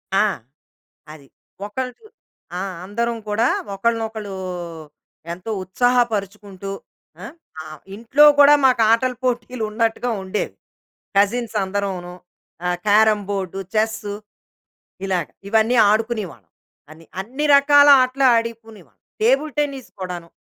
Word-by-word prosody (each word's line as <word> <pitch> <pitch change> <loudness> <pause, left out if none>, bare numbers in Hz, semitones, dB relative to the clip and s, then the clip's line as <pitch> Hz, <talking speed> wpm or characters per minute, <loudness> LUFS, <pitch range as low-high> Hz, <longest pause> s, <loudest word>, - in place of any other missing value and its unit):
ఆ! 200 - +4 0.9
అది. 150 -3 -14 0.4
ఒకల్‌జు 250 - -6 0.5
ఆ! - - -3 0.2
అందరం 235 +4 -2
కూడా 215 +3 +1 0.3
ఒకళ్ళనొకళ్లు, 220 -2 -2 1.0
ఎంతో 180 +6 -8
ఉత్సాహపరుచుకుంటూ, 200 -3 -1 0.9
ఆ! - - -12 0.3
ఇంట్లో 235 +7 +4 0.2
కూడా 290 +1 +8
మాకు 250 -3 +3
ఆటల 250 +2 +1
పోటీలు 245 -1 -2
ఉన్నట్టుగా 230 +2 -1
ఉండేవి. 190 +2 -3 0.6
కజిన్స్ 220 +3 +1
అందరంను, 190 -2 -4 0.5
ఆహ్, 180 0 0
క్యారమ్ 210 0 +4
బోర్డు, 195 -2 -3 0.2
చెస్సు, 215 -1 -1 0.9
ఇలాగ 180 -5 -1 0.2
ఇవన్నీ 220 +3 +3
ఆడుకునేవాళ్ళం. 210 - -2 0.4
అని 160 +1 -15 0.2
అన్ని 260 +9 -4
రకాల 285 +1 +6
ఆటలు 255 +2 +1
ఆడుకునేవాళ్ళం. 225 -4 -5 0.2
టేబుల్ 275 +6 +2
టెన్నిస్ 280 -3 -3
కూడాను. 175 -2 -6
220 Hz, 100 wpm, -21 LUFS, 195-245 Hz, 1.0 s, కూడా